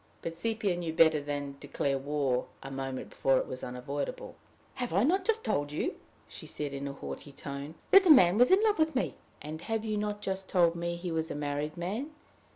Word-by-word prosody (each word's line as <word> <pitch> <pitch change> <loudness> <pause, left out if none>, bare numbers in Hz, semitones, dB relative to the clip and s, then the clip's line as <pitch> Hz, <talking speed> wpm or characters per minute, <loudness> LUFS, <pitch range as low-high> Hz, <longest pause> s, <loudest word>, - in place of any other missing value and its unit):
But 165 - -4
Sepia 210 +1 -1
knew 170 -2 -3
better 160 -2 +5
than 145 -1 -4
declare 140 -1 -1
war 135 -3 0 0.2
a 135 - -7
moment 135 -1 -5
before 135 -1 +2
it - - 0
was 130 - -6
unavoidable. 135 +3 -4 0.4
"Have 245 -9 -3
I 195 - +4
not 370 +8 +3
just 450 0 +1
told 145 0 0
you," 150 - -1 0.3
she - - -9
said, 145 -2 -4
in 140 0 -4
a 140 - -4
haughty 140 +1 -7
tone, 140 +2 -7 0.2
"that 390 0 +9
the 370 - +2
man 210 - +7
was 245 - +6
in 385 +3 +5
love 425 -5 +3
with 315 -1 +2
me?" 260 - 0 0.3
"And 155 +2 -6
have 225 +3 -2
you 215 -1 -1
not 210 0 -2
just 190 0 -3
told 170 -2 +4
me 170 0 -2
he 175 0 -5
was 160 0 -1
a - - -4
married 145 +1 -3
man? 205 - -3
165 Hz, 215 wpm, -30 LUFS, 145-210 Hz, 0.4 s, that